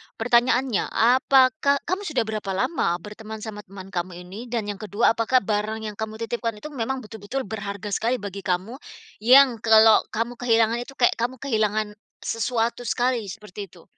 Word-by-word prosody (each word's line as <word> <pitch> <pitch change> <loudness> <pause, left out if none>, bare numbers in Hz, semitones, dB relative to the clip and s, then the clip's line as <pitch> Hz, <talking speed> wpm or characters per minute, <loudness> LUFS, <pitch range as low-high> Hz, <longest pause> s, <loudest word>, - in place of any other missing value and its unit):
pertanyaannya, 240 0 +2
apakah 260 +4 +4
kamu 370 +3 -1
sudah 285 -7 0
berapa 210 -3 -3
lama 190 - 0
berteman 215 +1 -9
sama 215 -2 -6
teman 190 0 -10
kamu 180 0 -4
ini? 190 +4 -10
Dan 230 -2 -2
yang 200 - -9
ke-2, 215 +1 +2
apakah 230 +1 +2
barang 215 +1 -2
yang 210 -1 -5
kamu 220 0 -4
titipkan 230 -1 -3
itu 305 - -7
memang 265 0 -3
betul-betul 220 +5 -5
berharga 200 -1 -6
sekali 230 +5 +1
bagi 200 -1 -6
kamu, 190 +7 -2 0.5
yang 255 0 +7
kalau 220 0 +6
kamu 230 +2 -2
kehilangan 230 -1 +2
itu 275 - -11
kayak 240 - +3
kamu 245 +2 -1
kehilangan 215 -5 0 0.4
sesuatu 230 +1 -1
sekali 245 -4 0
seperti 205 0 -8
itu? 175 -3 -18
225 Hz, 165 wpm, -24 LUFS, 210-245 Hz, 0.5 s, yang